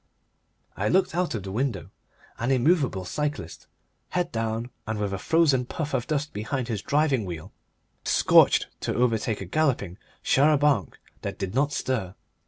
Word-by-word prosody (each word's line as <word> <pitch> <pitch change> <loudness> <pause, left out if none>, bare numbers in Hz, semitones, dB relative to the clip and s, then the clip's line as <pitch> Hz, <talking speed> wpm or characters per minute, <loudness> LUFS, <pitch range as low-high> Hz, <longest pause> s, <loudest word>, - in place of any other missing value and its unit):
I - - 0
looked 190 -3 +2
out 175 -5 0
of 105 - -4
the 95 - -6
window. 115 -3 -2 0.5
An 120 - -1
immovable 135 - +2
cyclist, 145 - -4 0.4
head 180 -1 -1
down 115 +1 -2 0.2
and 110 0 -2
with 100 -1 -1
a 95 - -3
frozen 155 -5 +3
puff 150 0 -4
of 125 -2 -1
dust 150 0 -2
behind 115 +4 -3
his 110 -4 -2
driving 145 -4 +1
wheel, 85 -4 -7 0.5
scorched - - +5
to - - -2
overtake 115 -3 +1
a - - -4
galloping 105 - 0 0.2
char 145 +3 +4
a - - +4
banc 140 - +1 0.2
that - - -5
did 95 0 -4
not 140 +3 +2
stir. 115 -11 -2
125 Hz, 165 wpm, -26 LUFS, 105-150 Hz, 0.5 s, scorched